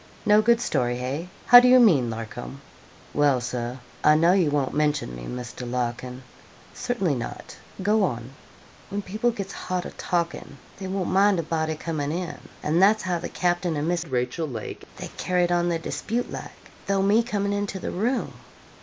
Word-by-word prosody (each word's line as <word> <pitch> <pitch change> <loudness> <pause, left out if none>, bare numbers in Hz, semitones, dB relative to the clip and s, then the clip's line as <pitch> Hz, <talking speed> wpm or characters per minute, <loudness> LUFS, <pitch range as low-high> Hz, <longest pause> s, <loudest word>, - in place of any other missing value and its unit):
'No 210 0 +6
good 235 +1 +4
story 120 - 0
hey? 140 +8 -4 0.2
How 245 - +11
do 250 - +4
you 255 0 +7
mean, 155 - +5
Larcom?' 115 +4 -6 0.5
'Well, 145 -3 +3
Sir, 120 0 -4 0.3
I 150 - +6
know 165 +3 +5
you 180 -6 +3
won't 145 -2 0
mention 150 - 0
me, - - -8
Mr. 125 - -6
Larkin.' 125 +1 -3 0.5
'Certainly 235 - -1
not 120 -3 -6 0.3
go 210 +2 +3
on.' 120 -7 -2 0.6
'When 205 0 -3
people 215 +6 0
gets 200 -4 -5
hot 180 -1 -3
a - - -6
talking 170 -4 -3 0.2
they 190 - -5
won't 190 -1 -2
mind 200 0 +4
a 170 - -1
body 160 0 -1
comin' 150 -2 -3
in; 175 +1 -4 0.2
and 160 +4 +2
that's 210 +3 +5
how 180 -2 -1
the - - -5
capting 175 -2 0
and 145 +2 -1
Miss 175 -1 0
Rachel 130 +3 -2
Lake 115 -6 -7
they - - -6
carried 180 -1 +1
on 175 0 +2
their 170 - +1
dispute 230 +8 -3
like, - - -9 0.2
though 195 -1 +2
me 205 +4 +4
coming 205 -3 -1
into 205 -1 -2
the - - -4
room.' 240 +7 -1
170 Hz, 180 wpm, -25 LUFS, 130-200 Hz, 0.6 s, How